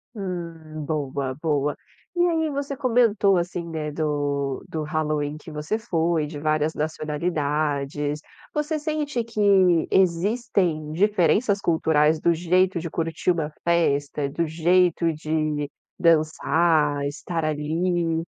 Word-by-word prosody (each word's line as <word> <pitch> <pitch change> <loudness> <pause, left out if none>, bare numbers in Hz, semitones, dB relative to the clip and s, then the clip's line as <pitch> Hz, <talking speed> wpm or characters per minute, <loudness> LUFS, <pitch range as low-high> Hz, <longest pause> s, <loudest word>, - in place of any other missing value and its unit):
Hum. 165 -6 -6
Boa, 140 -3 -2
boa. 150 -2 0 0.4
E 350 0 +3
aí 320 -2 +1
você 280 -1 -3
comentou 225 -6 +3
assim, 175 0 -3
né, 155 -2 -4
do 145 -3 -1
do 160 -1 -3
Halloween 150 -1 -1
que 155 - -11
você 150 +7 -2
foi, 165 -6 0
de 150 0 -7
várias 155 +1 +1
nacionalidades. 150 -2 -2 0.3
Você 300 +1 -1
sente 300 -4 -2
que 225 -2 -3 0.5
existem 185 -4 +1
diferenças 200 +3 +2
culturais 160 -3 +2
do 170 - +3
jeito 180 +2 +2
de 170 0 -5
curtir 165 +2 -1
uma 160 -3 -2
festa? 145 -4 +1
Do 165 +4 -1
jeito 170 +1 +2
de 155 -1 -2 0.3
dançar, 155 -2 +2
estar 165 +3 -3
ali? 165 +2 0
160 Hz, 120 wpm, -24 LUFS, 150-180 Hz, 0.5 s, E